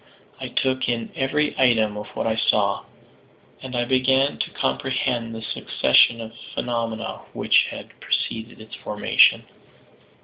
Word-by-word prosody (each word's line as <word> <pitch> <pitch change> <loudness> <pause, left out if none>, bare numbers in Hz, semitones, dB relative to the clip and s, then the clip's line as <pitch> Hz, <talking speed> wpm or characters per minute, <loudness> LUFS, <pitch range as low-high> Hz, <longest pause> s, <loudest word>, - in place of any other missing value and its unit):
I - - -5
took 130 -1 0
in 115 -1 -2
every 150 +3 0
item 110 -5 +3
of 105 0 -6
what - - -2
I 110 -1 +1
saw, 110 - +1 0.8
and 130 -1 -7
I 120 0 0
began 130 +2 +2
to - - -2
comprehend 120 - -2
the 110 - -7
succession 115 +2 +3
of 110 -1 -7 0.2
phenomena 115 -2 -3
which - - +3
had - - -10
preceded 115 +1 -3
its 110 0 -13
formation. 105 0 +3
120 Hz, 135 wpm, -23 LUFS, 110-130 Hz, 0.8 s, item